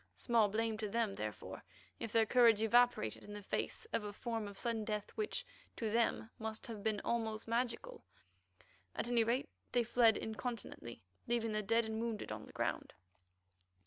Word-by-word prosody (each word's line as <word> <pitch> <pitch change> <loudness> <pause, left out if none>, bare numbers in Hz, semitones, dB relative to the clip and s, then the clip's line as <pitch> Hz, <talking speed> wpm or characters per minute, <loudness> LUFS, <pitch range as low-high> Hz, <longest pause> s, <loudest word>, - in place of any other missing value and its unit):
Small 230 -4 +3
blame 220 +1 0
to 215 -2 -2
them, 225 -1 +1
therefore, 110 - -5 0.4
if 230 - -4
their 225 0 +5
courage 230 -2 +6
evaporated 235 - +3
in 205 0 -7
face 320 - -2
of 220 - +1
a 205 - -4
form 225 0 -3
of 200 -1 -9
sudden 230 -2 -1
death 210 -1 -3
which 430 -1 -2 0.3
to 220 -2 -2
them 230 0 +1
must 220 0 -4
have 220 -3 -6
been 215 0 0
almost 225 -2 -1
magical. 245 - -1 0.9
At - - -1
any 240 -1 +4
rate 250 +7 0 0.2
they 245 -1 +4
fled 230 -1 +5
incontinently, 220 - -5 0.2
leaving 230 -1 +1
their 215 0 0
dead 230 +2 +2
and 220 0 -3
wounded 230 -2 -3
on - - -6
the - - -12
ground. - - -2
225 Hz, 170 wpm, -37 LUFS, 215-235 Hz, 0.9 s, courage